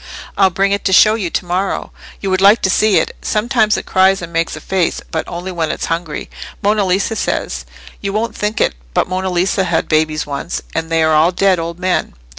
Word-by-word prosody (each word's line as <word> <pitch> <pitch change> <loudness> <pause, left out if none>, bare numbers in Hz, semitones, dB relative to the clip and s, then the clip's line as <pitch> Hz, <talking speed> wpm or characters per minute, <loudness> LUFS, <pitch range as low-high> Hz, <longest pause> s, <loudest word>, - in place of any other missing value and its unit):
I'll 195 -1 +4
bring 195 +2 0
it 200 0 0
to 190 - +2
show 215 +3 +7
you 205 -6 -2
to 180 - -2
morrow. 185 +3 -2 0.3
You 195 - -2
would 185 0 +1
like 200 +3 +5
to 190 - +3
see 215 0 +3
it. - - 0
Sometimes 220 -1 +1
it - - -5
cries 190 +1 +3
and 170 0 -8
makes 165 -1 -1
a - - -7
face, 180 +1 -1
but 160 - -1
only 175 +2 -5
when 165 -3 -2
it's - - -3
hungry, 165 -2 -5 0.4
Monna 205 0 +2
Lisa 195 +4 0
says. 65 - -2 0.4
You 200 - -2
wouldn't 225 +2 -2
think 210 +1 -2
it, - - +2 0.2
but - - +2
Monna 185 +1 -2
Lisa 185 +2 +1
had 170 -3 0
babies 155 -1 +1
once, 145 +4 -4
and 165 0 -2
they 165 -1 +2
are 160 0 +3
all 155 +3 +4
dead 190 0 +2
old 165 +1 -4
men. 185 0 -1
185 Hz, 225 wpm, -16 LUFS, 165-200 Hz, 0.4 s, show